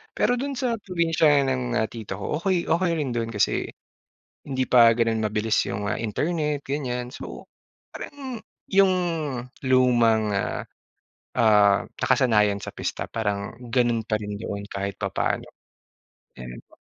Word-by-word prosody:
Pero 245 0 +2
do'n 280 +1 -3
sa 245 -3 -1
probinsiya 165 -5 +3
ng, 125 -2 -1
ah, 110 - +1
tito 110 -4 -6
ko 150 +9 -2
okey 180 -1 +1
okey 170 +1 +2
rin 145 -5 -2
do'n 115 -1 -1
kasi 105 - +1 0.7
hindi 130 -2 -2
pa 120 -3 +7
gano'n 115 -1 +1
mabilis 110 +1 0
'yong, 100 +1 -3
ah, - - -1
internet 150 +6 -1
ganyan. 125 -3 -3
So - - -8 0.5
parang 265 -5 -7 0.3
'yong 195 -1 +5 0.8
lumang, 115 -4 +4
ah, 100 - -1 0.8
ah, 105 -3 +5 0.2
nakasanayan 105 -4 +3
sa - - -7
pista - - -3
parang 100 -3 -3 0.2
gano'n 120 -2 +2
pa 110 -1 0
rin 105 -1 -6
doon 100 -2 -5
kahit 100 0 -4
papaano 95 -2 -1 0.9
ganun 60 -1 -8
po. - - -22
120 Hz, 140 wpm, -25 LUFS, 105-150 Hz, 0.9 s, pa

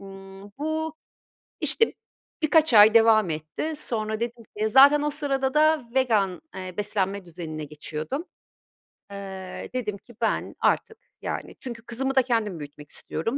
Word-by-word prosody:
ımm, 195 0 -11 0.2
bu, 315 +1 -2 0.7
işte, 455 - +2 0.5
birkaç 310 -4 +4
ay 215 +1 +8
devam 220 -4 +5
etti. 155 - -4
Sonra 220 -5 -2
dedim 235 0 -4
ki 215 +1 +1
Zaten 280 +5 +7
o 295 - +1
sırada 275 -3 -1
da 310 -2 +4
vegan, 215 -8 +2
eee, 185 -1 -6
beslenme 200 -2 -1
düzenine 160 -3 -6
geçiyordum. 155 - -5 0.9
Eee, 190 -2 -7
dedim 215 -5 -2
ki: 235 +5 -18
"Ben - - -1
artık, 445 - +1 0.2
yani - - -5
Çünkü 235 -3 -6
kızımı 265 +3 -2
da 265 - +7
kendim 225 -8 -1
büyütmek 145 0 -10
istiyorum; 225 - -1
220 Hz, 140 wpm, -25 LUFS, 190-270 Hz, 0.9 s, ay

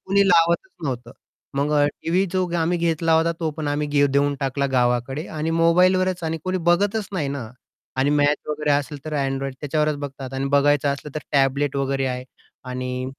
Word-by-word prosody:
कोणी 200 +1 +4
लावतच 170 - +3
नव्हतं, 125 -3 -4 0.4
मग 145 +2 0 0.3
टीव्ही 180 +4 +2
जो 185 -1 +1
आम्ही 170 +2 +1
घेतला 165 -1 +1
होता 165 +1 +3
तो 160 -2 0
पण 150 0 -4
आम्ही 145 0 +2
देऊन 140 +1 +1
टाकला 140 0 0
गावाकडे. 125 +4 0
आणि 155 +1 -3
मोबाईलवरच 180 +2 +3
आणि 160 0 -2
कोणी 185 0 -1
बघतच 205 +3 +1
नाही 155 -7 -1
ना. 130 -6 -5 0.5
आणि 135 +2 +2
मॅच 145 0 +3
वगैरे 150 0 -1
असेल 145 +1 0
तर 155 - -6
Android 135 -1 -1
त्याच्यावरच 150 +1 0
बघतात 135 -2 -7
आणि 135 +1 -2
बघायचं 145 0 +3
असलं 145 +1 -7
तर - - -1
टॅबलेट 140 0 +2
वगैरे 135 -1 0
आहे. 125 0 -3 0.4
आणि 125 0 -4
145 Hz, 175 wpm, -23 LUFS, 135-165 Hz, 0.5 s, कोणी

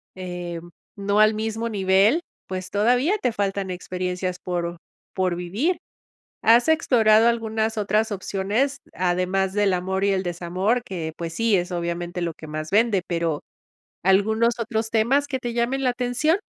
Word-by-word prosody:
em, 175 -2 -6 0.3
no 200 +1 +1
al 215 0 +5
mismo 220 +1 -2
nivel, 200 - +3 0.3
pues 185 -1 -5
todavía 245 - +2
te 250 - +1
faltan 200 -2 -2
experiencias 180 0 -3
por 175 -1 -3 0.4
por 185 -2 0
vivir. 205 - -1 0.6
¿Has 235 +4 +5
explorado 230 -8 +4
algunas 225 -1 0
otras 215 +1 +1
opciones, 205 +7 -1 0.2
además 185 +1 0
del 205 -2 +2
amor 190 +2 -1
y 200 - +3
el 190 -1 0
desamor? 185 +7 -1
Que, 165 -4 -4
pues 165 -1 -5
sí, 230 +2 +2
es 175 0 -2
obviamente 175 0 -3
lo 170 -1 -2
que 155 - -11
más 155 0 -5
vende, 210 -2 +3
pero, 165 -3 -1 0.6
¿algunos 220 +5 +3
otros 225 -1 -2
temas 240 +6 +2
que 265 -3 -2
te 240 -1 -4
llamen 245 +3 0
la 255 - +3
atención? 250 +7 +1
200 Hz, 150 wpm, -23 LUFS, 180-230 Hz, 0.6 s, al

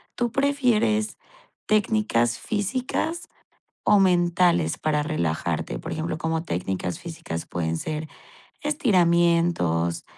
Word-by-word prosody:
¿tú 240 -1 0
prefieres 245 -5 +1 0.5
técnicas 210 - +2
físicas 255 - -2 0.6
o 205 - +5
mentales 175 - +3
para 150 -1 0
relajarte?, 80 - -2
por - - -5
ejemplo, 160 0 -3
como 160 +1 -1
técnicas 90 - -3
físicas 160 - -6
pueden 80 -1 -2
ser 155 - -4 0.5
estiramientos 170 - +2
170 Hz, 95 wpm, -24 LUFS, -, 0.6 s, o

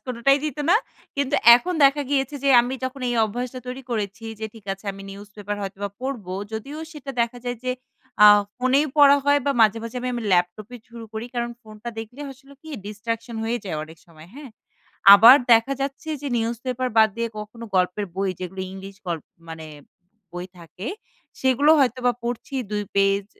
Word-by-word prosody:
কোনোটাই 255 +3 +2
দিত 305 0 -3
না 425 - +7 0.4
কিন্তু 280 -1 0 0.2
এখন 360 +9 -4
দেখা 280 +1 +4
গিয়েছে 270 0 0
যে 275 - +3
আমি 250 +2 -3
যখন 260 +1 -5
এই 240 - -1
অভ্যাসটা 245 +4 -5
তৈরি 255 +2 -6
করেছি 215 0 -3 0.2
যে 220 - -2
ঠিক 220 -3 -14
আছে 195 +2 -11
আমি 195 0 -11
নিউজপেপার 205 +1 -7
হয়তোবা 200 +1 -5
পড়বো 240 -9 -4 0.2
যদিও 275 +8 -6
সেটা 285 -2 -8
দেখা 235 +1 -1
যায় 245 -1 -3
যে 255 - 0 0.5
আ - - +11 0.3
ফোনেই 260 +4 +2
পড়া 285 -1 +7
হয় 285 0 +4
বা 280 - +3
মাঝে, 220 +1 +4
মাঝে 230 +2 -7
আমি 255 - -3
আমি 235 - -4
ল্যাপটপে 180 +7 0
শুরু 230 -1 -9
করি 220 +2 -5
কারণ 240 0 -2
ফোনটা 215 +1 -10
দেখলে 225 +5 -8
আসলে 275 +1 -18
কি? 315 - -12 0.2
distraction 230 +2 -5
হয়ে 235 +2 -1
যায় 175 -5 -4
অনেক 160 +1 -12
সময় 160 0 -16
হ্যাঁ? 280 -3 -10 0.6
আবার 230 +6 +9 0.2
দেখা 230 +4 +4
যাচ্ছে 275 +3 -4
যে 285 - -3
নিউজ 230 +1 -1
পেপার 255 0 -1
বাদ 220 0 +7
দিয়ে 235 0 -1
কখনো 215 +2 -8
গল্পের 185 +3 0
বই 195 -1 0
যেগুলো 185 +1 -6
ইংলিশ 195 0 -10
গল্প 165 -3 -3 0.2
মানে 160 -1 -8 0.7
বই 175 +1 -6
থাকে 175 +5 -10 0.5
সেগুলো 265 +3 +3
হয়তোবা 250 -1 +2
পড়ছি 240 +3 -5 0.2
২ 210 0 -2
পেজ। 195 0 +2
230 Hz, 180 wpm, -23 LUFS, 200-260 Hz, 0.7 s, আ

